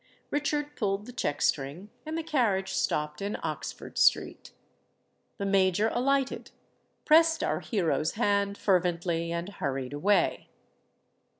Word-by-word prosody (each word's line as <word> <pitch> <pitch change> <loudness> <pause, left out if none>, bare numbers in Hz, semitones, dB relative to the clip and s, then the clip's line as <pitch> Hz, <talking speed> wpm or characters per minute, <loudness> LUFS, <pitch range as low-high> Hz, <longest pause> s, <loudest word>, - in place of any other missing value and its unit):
Richard 295 0 -1
pulled 200 -1 -1
the 250 - -9
check 145 - -2
string; 150 +9 -1 0.2
and 315 +1 -3
the 330 - -2
carriage 210 -11 +1
stopped 150 +1 -1
in 200 +1 -2
Oxford - - -5
Street. - - +2 0.9
The 200 - -3
Major 195 +2 +3
alighted—pressed 300 +4 +1
our - - 0
hero's 170 - 0
hand 200 -2 +1
fervently—and 170 -2 0
hurried 135 -1 -3
away. 185 +5 +1
200 Hz, 110 wpm, -28 LUFS, 170-250 Hz, 0.9 s, Major